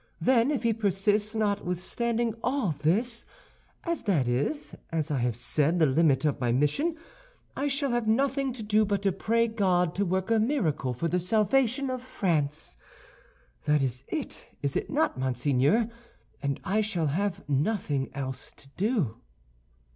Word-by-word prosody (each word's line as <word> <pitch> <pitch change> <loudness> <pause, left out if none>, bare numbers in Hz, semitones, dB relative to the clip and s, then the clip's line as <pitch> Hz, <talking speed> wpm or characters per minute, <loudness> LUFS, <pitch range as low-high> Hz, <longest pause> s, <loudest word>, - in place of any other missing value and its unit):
Then, 235 +7 +3
if 285 -5 -1
he 230 -1 +3
persists, 210 +1 +1
notwithstanding 215 +3 -1
all 255 - 0
this—as 235 - -2
that 165 - +1
is, 145 +4 -1 0.2
as 160 -2 -1
I 140 - 0
have 120 -2 0
said, 145 +7 +2
the 165 - +5
limit 150 0 +3
of 150 - +1
my 120 -1 +1
mission—I 320 - -2
shall 280 -1 0
have 240 -2 0
nothing 270 +4 +1
to 235 -3 -7
do 215 +1 +3
but 200 -1 -1
to 195 - +3
pray 230 +5 +1
God 185 -6 +1
to 200 - 0
work 190 +3 -1
a 225 - +4
miracle 165 - 0
for 165 +8 -1
the 180 +2 +1
salvation 230 +7 +2
of 255 -1 -3
France. 155 - -2 0.9
That 150 -2 +3
is 130 0 -2
it, - - -5
is 140 -1 -1
it - - -1
not, 295 - 0
monseigneur, 135 - +2 0.5
and 140 -1 -1
I 205 +3 +1
shall 195 -6 -1
have 175 +5 -1
nothing 145 - 0
else 130 -2 -5
to 135 - -17
do?" 195 - 0
195 Hz, 155 wpm, -28 LUFS, 150-230 Hz, 0.9 s, the